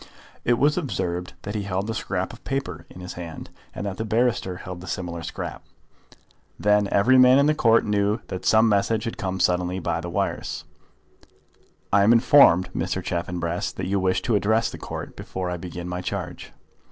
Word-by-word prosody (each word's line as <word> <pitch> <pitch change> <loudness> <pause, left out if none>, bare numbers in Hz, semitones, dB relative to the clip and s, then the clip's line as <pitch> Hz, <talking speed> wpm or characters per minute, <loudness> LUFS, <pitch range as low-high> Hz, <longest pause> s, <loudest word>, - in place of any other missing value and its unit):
It 120 0 +2
was 150 +6 +3
observed 90 - -3
that 100 - -5
he 105 - -2
held 100 0 -2
a 115 - -2
scrap 95 -2 -3
of 120 - -14
paper 135 0 -4
in 90 - -11
his 90 - -7
hand, 85 -2 -8 0.2
and - - -4
that 95 -2 -4
the - - -2
barrister 110 -4 0
held 90 -1 -8
a - - -10
similar 85 -2 -4
scrap. - - -6 1.0
Then 105 0 +3
every 120 +6 +5
man 130 +1 +7
in 140 - +5
the 150 - +4
Court 115 -5 +4
knew 105 +1 +1
that 90 - -5
some 110 +1 +5
message 110 +1 +1
had 115 - -5
come 95 -1 -2
suddenly 90 0 +1
by 85 -2 -2
the 85 - -5
wires. - - -2 1.3
"I 100 - +6
am 105 +4 +6
informed, 115 -7 +6
Mr. - - -2
Chaffanbrass, 85 0 -2
that - - -4
you 100 +1 0
wish 95 0 +1
to 120 - 0
address 110 +3 +2
the - - -9
Court - - -7
before 90 -1 -4
I 90 - -3
begin 85 0 -7
my 90 0 -4
charge." - - -5
100 Hz, 190 wpm, -24 LUFS, 90-115 Hz, 1.3 s, man